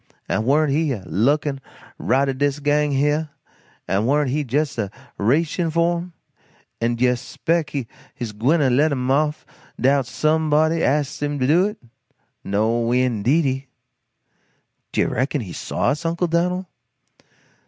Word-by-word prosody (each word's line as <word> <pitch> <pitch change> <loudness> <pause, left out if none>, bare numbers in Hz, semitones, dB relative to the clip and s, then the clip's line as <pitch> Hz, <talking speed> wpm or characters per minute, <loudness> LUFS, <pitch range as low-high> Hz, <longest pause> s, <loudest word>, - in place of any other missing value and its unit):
An' 110 - -1
warn't 145 +3 +3
he 150 0 +1
a 100 -6 -6
lookin' 135 +8 +1 0.4
right 135 +4 +2
at 130 -1 -3
dis 140 0 +1
gang 150 0 +1
heah, 150 +3 +1 0.6
an' 100 +4 +1
warn't 145 -1 +2
he 150 +2 0
jes' 140 +1 -1
a 100 -3 -1 0.3
reachin' 160 - +1
for 170 +2 +2
'em? 175 0 -9 0.7
An' 120 +1 +1
d'you 125 +1 +2
spec' 160 +6 -2
he 135 -5 -4 0.3
gwyne 120 +7 +1
to 135 -3 +3
let 145 +5 +3
'em 130 -1 -1
off 150 +2 +1 0.3
'dout 135 -1 +2
somebody 155 +3 +2
ast 145 0 0
him 145 0 -1
to 130 - 0
do 170 +8 +4
it? 210 +1 -6 0.7
No 115 +4 0
indeedy!" 130 +3 +1 1.2
"Do - - +1
you - - +2
reckon 135 +3 -1
he 95 -6 -7
saw, - - -1
us, 150 +3 -1
Uncle 170 +2 0
Dan'l? 180 +2 0
145 Hz, 150 wpm, -22 LUFS, 125-155 Hz, 1.2 s, do